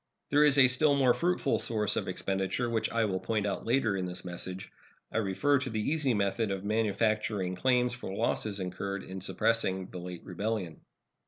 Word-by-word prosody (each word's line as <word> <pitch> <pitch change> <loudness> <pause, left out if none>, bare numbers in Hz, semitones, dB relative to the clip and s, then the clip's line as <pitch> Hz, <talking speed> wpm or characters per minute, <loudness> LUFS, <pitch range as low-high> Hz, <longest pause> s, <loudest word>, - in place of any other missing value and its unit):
There 145 +1 +5
is 145 -2 +5
a 135 -2 +8
still 145 +3 +3
more 130 -3 +4
fruitful 175 -5 +1
source 105 -2 0
of - - -2
expenditure, 95 +5 -1
which 115 -2 0
I 115 -1 +1
will 95 -3 -1
point 110 0 -1
out 100 - -3
later 115 -4 +2
in 95 -1 -2
this 90 +1 -5
message. 90 +1 -5 0.4
I - - 0
refer 115 +8 +2
to 130 0 -4
the 110 -2 -2
easy 145 -6 +1
method 100 +2 0
of 95 -1 -3
manufacturing 105 -2 0
claims 125 +3 +2
for 120 -6 -6
losses 100 +1 -1
incurred 100 +2 -4
in 95 0 -7
suppressing 95 -2 0
the 90 - -6
late 90 0 -7
rebellion. 95 -2 -3
105 Hz, 185 wpm, -30 LUFS, 95-125 Hz, 0.4 s, a